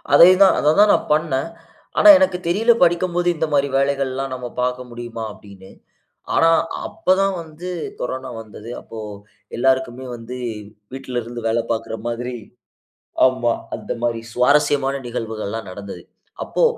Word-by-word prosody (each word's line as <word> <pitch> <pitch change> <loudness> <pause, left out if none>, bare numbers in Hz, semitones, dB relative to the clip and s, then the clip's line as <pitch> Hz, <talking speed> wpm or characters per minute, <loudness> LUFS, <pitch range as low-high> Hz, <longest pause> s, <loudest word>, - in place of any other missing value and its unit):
அதே 170 +5 +9
தான் 195 - +7
அதை 150 - +3
தான் 210 0 +7
நான் - - +1
பண்ணேன். 150 -2 0 0.5
ஆனா 315 - +7
எனக்கு 275 -11 +2
தெரியல 220 +7 +4
படிக்கும்போது, 175 0 +2
"இந்த 160 0 0
மாரி 140 0 +2
வேலைகள்லாம் 135 -1 -1
நம்ம 125 -1 -6
பார்க்க 125 0 -2
முடியுமா?" 120 -1 -7
அப்படீன்னு. 100 -2 -15 0.6
ஆனா 165 - +5 0.4
அப்ப 185 - +1
தான் 195 -1 +1
வந்து 160 +3 -9 0.3
கொரோனா 130 +1 -4
வந்தது. 110 +1 -11
அப்போ 115 - -11 0.6
எல்லாருக்குமே 130 0 0
வந்து 120 +2 -8 0.6
வீட்டில 130 -2 -4
இருந்து 120 +1 -8
வேலை 115 +1 +1
பார்க்கிற 115 0 -4
மாதிரி 120 +1 -4 0.9
ஆமா, 130 -2 +2 0.2
அந்த - - -8
மாரி 115 -1 -1
சுவாரஸ்யமான 140 +1 +2
நிகழ்வுகள்ல்லாம் 110 -2 -5
நடந்தது. 100 +1 -8 0.4
அப்போ - - -1
130 Hz, 135 wpm, -20 LUFS, 120-155 Hz, 0.9 s, அதே